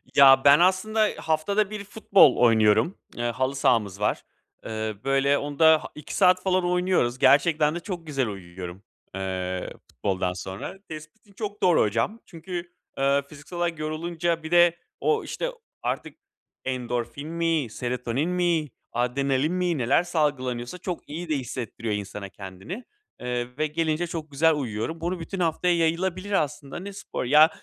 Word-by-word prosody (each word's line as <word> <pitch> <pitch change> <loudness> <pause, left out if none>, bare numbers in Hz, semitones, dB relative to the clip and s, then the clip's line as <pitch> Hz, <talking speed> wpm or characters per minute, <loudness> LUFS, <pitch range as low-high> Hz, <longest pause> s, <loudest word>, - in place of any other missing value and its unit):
Ya, 135 -1 +8
ben 140 +2 +8
aslında 210 +4 +3
haftada 190 +6 +1
1 210 -1 -5
futbol 200 - +4
oynuyorum. 110 - +4 0.2
Eee, 120 - -2
halı 130 +3 -1
sahamız 105 -7 +1
var. 105 +1 0 0.4
Eee, 110 -1 -3
böyle, 135 +1 +3
onda 155 +2 +4
ha - - -7
2 150 -1 -7
saat 185 -1 +4
falan 185 -1 +2
oynuyoruz. 180 -9 +1
Gerçekten 150 +3 +4
de - - -2
çok 175 -3 -6
güzel 135 -5 0
uyuyorum, 90 -1 -8 0.3
eee, 95 -1 -3 0.2
futboldan 95 -2 -1
sonra. 95 - -6
Tespitin 155 +7 -11
çok 205 0 -6
doğru 180 -2 +5
hocam. 115 - 0
Çünkü, 175 +1 -7 0.3
eee, 140 +1 +3
fiziksel 150 +4 -10
olarak 170 -2 -1
yorulunca, 165 +2 -2
bir 160 - -7
de 175 -1 +5 0.2
o, 445 0 +1
işte, - - -3 0.3
artık - - -3 0.5
endorfin 125 +2 -3
mi, 165 -4 0
serotonin 125 +6 -2
mi, 175 -4 +1 0.2
adrenalin 135 +5 0
mi 180 -2 0
neler 125 +6 +3
salgılanıyorsa, 130 -5 -1
çok 180 -3 -6
iyi 165 +3 -6
de 155 - +2
hissettiriyor 115 -3 -4
insana 100 0 -6
kendini. 95 - -8 0.4
Eee, 125 0 -4
ve 155 +1 +1
gelince 160 +2 -1
çok 160 -2 -6
güzel 160 +4 +4
uyuyorum. 130 +4 -3
Bunu 175 +2 -2
bütün 185 +3 -6
haftaya 175 +1 +1
yayılabilir 180 +4 0
aslında. 150 -5 -1
Ne 200 +2 -7
spor? 195 - -5
Ya, 150 +5 +7
150 Hz, 150 wpm, -25 LUFS, 125-175 Hz, 0.5 s, Ya